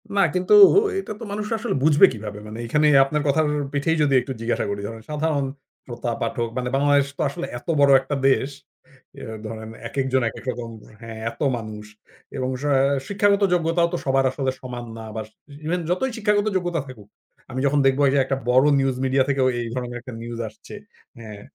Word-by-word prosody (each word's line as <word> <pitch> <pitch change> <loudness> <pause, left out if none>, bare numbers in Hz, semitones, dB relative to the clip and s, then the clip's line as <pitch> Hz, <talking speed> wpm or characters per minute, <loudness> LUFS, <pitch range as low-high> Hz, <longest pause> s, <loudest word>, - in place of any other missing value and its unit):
না 200 - +4
কিন্তু 180 - +2 0.5
এটা 215 - -5
তো - - -8
মানুষ 210 +1 -3
আসলে 230 - -2
বুঝবে 150 -2 +7
কিভাবে? 105 -1 -7
মানে 110 +2 -8
এখানে 150 +5 +3 0.2
আপনার 150 +2 -1
কথার 150 +2 +2 0.3
পিঠেই 155 +3 +1
যদি 140 -2 +2
একটু 135 - -7
জিজ্ঞাসা 115 +1 -1
করি, 100 0 -3
ধরেন 115 0 -8
সাধারণ 150 -2 0 0.4
শ্রোতা 120 -1 -4
পাঠক 115 0 -1
মানে 125 0 -2
বাংলাদেশ 140 0 +3
তো - - -3
আসলে 170 +5 -5
এত - - -27
বড় 140 -1 +6
একটা 145 - -3
দেশ। 135 +1 +1 0.7
এ - - -9
আ - - -6
ধরেন 110 0 -7 0.2
একেকজন 130 -1 0
একেক - - -11
রকম 120 -1 -7 0.3
হ্যাঁ 115 -1 -8
এত 115 - -17 0.2
মানুষ 105 -1 -8 0.5
এবং 130 0 -2
সাঁ 145 -2 +2 0.3
শিক্ষাগত 200 0 +2
যোগ্যতাও 170 0 +2
তো - - 0
সবার 135 0 +2
আসলে 135 -1 -1
সমান 125 -2 -6
না। 110 - -8
বাস 110 -1 -5 0.4
ইভেন 180 +2 0
যতই 245 +9 0
শিক্ষাগত 210 -1 +1
যোগ্যতা 175 -4 -2
থাকুক। 110 -6 -12 0.4
আমি 130 - -3
যখন 145 +1 +2
দেখবো 135 +2 +2
যে - - +2
একটা 135 0 -1
বড় 130 +3 +5
নিউজ 135 -1 +1
মিডিয়া 130 0 +3
থেকেও 135 -1 +2
এই 115 - -4
ধরনের 125 -1 -4
একটা 125 -1 -9
নিউজ 120 0 -6
আসছে। - - -13 0.4
হ্যাঁ, 105 -3 -10
135 Hz, 190 wpm, -23 LUFS, 120-155 Hz, 0.7 s, বুঝবে